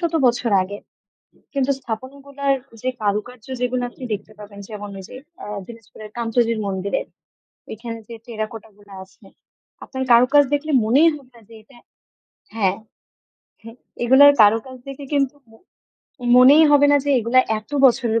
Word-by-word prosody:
শত 340 -2 -2
বছর 240 -1 0
আগের। 200 +2 -8 0.7
কিন্তু 275 -1 -1
স্থাপনগুলার 275 +4 -4 0.3
যে 255 - -3
কারুকার্য, 215 +3 -3
যেগুলা 250 0 -1
আপনি 255 - -11
দেখতে 210 +1 -6
পাবেন, 205 -1 -12
যেমন 205 -1 -8
ওই 190 - -10
যে - - -11 0.5
দিনাজপুর 225 -3 -14 0.2
কান্তজির 230 -1 0
মন্দিরে। 195 0 -2 0.7
ওইখানে 230 +1 -7
যে 235 - -8
টেরাকোটা 225 -1 -6
গুলা 200 -1 -16
আছে, 190 - -23 0.6
আপনার 260 -1 -6
কারুকাজ 250 +5 +5
দেখলে 300 +2 -2
মনেই 275 +9 +4
হবে 265 -3 -16
না 235 - -17
যে, 230 - -15
এটা 240 +2 -21 0.8
হ্যাঁ, 195 -3 0 0.9
হ্যাঁ, 230 +1 -12 0.3
এগুলার 265 +4 +7
কারুকাজ 225 +5 +2
দেখে 275 +1 -8
কিন্তু 275 0 0 0.2
ম - - -20 0.8
মনেই 280 +5 +7
হবে 290 0 +5
না 285 - +5
যে, 285 - -1
এগুলা 240 +3 +3 0.2
এত 215 +5 -16
বছরের 235 -3 +3
240 Hz, 145 wpm, -20 LUFS, 215-270 Hz, 0.9 s, এগুলার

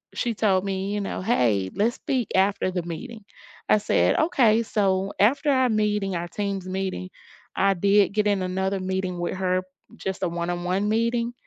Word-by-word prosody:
she 235 - -1
told 195 -3 +2
me, 195 +1 -2
you 205 - -1
know, 195 - -4
"Hey, 115 - +1
let's 225 +4 +1
speak 250 -6 -2
after 195 0 +2
the 180 -1 -2
meeting." 215 +6 -8 0.4
I 215 - +5
said, 90 - +2
"Okay." 245 -10 +3
So 195 -2 0
after 275 +8 +3
our 260 -1 +3
meeting, 210 -3 0
our 170 0 -3
Teams 195 0 -4
meeting, 185 0 -3 0.5
I 195 0 +3
did 200 +2 +3
get 210 0 +1
in 200 -2 +1
another 190 +1 -1
meeting 185 -1 -2
with 175 - -2
her 185 -1 0 0.3
just 190 0 -5
a 175 - +1
one-on-one 175 +3 -2
meeting, 235 +2 0
195 Hz, 175 wpm, -24 LUFS, 185-215 Hz, 0.5 s, I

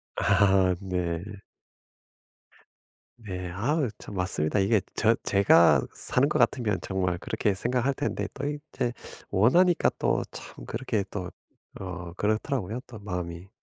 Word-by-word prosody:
아 95 -2 +4
네. 90 -3 -2 2.0
네. 90 -5 -5
아 135 - 0
참 - - -10
맞습니다. 90 -1 0
이게 100 +3 +3 0.2
저 115 +1 +4
제가 100 -4 +5
사는 140 +4 +2
것 150 - +1
같으면 120 -5 +2
정말 90 -2 -1
그렇게 100 +3 -1
생각할 125 +6 0
텐데 145 - -2
또 140 +1 -3
이제 145 -4 -3 0.4
원하니까 170 - +4
또 - - +1
참 - - -10
그렇게 115 -3 -2
또 90 -3 -5 0.5
어 90 -2 -6
그렇더라고요, 110 +2 -1
또 115 - -10
마음이. 90 -2 -5
100 Hz, 240 characters per minute, -27 LUFS, 90-125 Hz, 2.0 s, 제가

